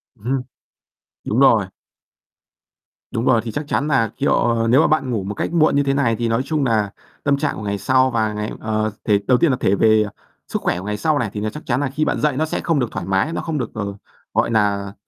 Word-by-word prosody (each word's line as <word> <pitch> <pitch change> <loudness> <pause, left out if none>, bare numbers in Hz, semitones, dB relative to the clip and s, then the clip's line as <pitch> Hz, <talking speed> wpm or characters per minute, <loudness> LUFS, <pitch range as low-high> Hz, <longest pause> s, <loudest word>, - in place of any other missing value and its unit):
Ừm 105 - -22
hưm. 130 +1 0 0.8
Đúng 110 - -1
rồi. 115 -7 +5 1.5
Đúng 115 - -1
rồi. 120 -3 +4
Thì 115 - -4
chắc 145 0 -4
chắn 145 - 0
là, 115 -7 +2
kiểu, 115 -4 +1
nếu 130 +5 +5
mà - - +4
bạn 140 -4 +1
ngủ 110 -5 -1
một 100 +2 -4
cách - - -3
muộn 155 -4 +3
như 145 - +4
thế 135 -1 0
này 125 -5 +1
thì 115 0 -1
nói 115 +3 +1
chung 150 +1 -1
nà 110 -5 +1 0.3
tâm 140 -1 +3
trạng 145 +1 -2
của - - -6
ngày 100 -1 -2
sau 130 +4 +3
và 110 -3 0
ngày 105 +1 -3
ờ, 110 0 -1
thể 105 -2 +3
đầu 125 -1 +5
tiên 170 - +3
là 130 - +2
thể 95 - +2
về 110 +1 +4 0.4
sức - - -3
khỏe 90 - 0
của - - -9
ngày 105 0 -2
sau 155 +7 +1
này, 115 -6 -1
thì 105 - -4
là 110 - -2
chắc 150 - -9
chắn 125 +1 0
là 140 -2 -1
khi 155 - +1
bạn - - -1
dậy 150 -3 +1
nó 155 +3 +1
sẽ - - -3
không 165 -3 0
được 120 -3 -1
thoải 85 - -4
mái, 95 +11 +1
nó - - -2
không 160 -2 -3
được, 120 - -3
ờ, 100 -2 -4 0.4
gọi - - +2
nà 100 -2 +1
115 Hz, 260 wpm, -20 LUFS, 105-140 Hz, 1.5 s, rồi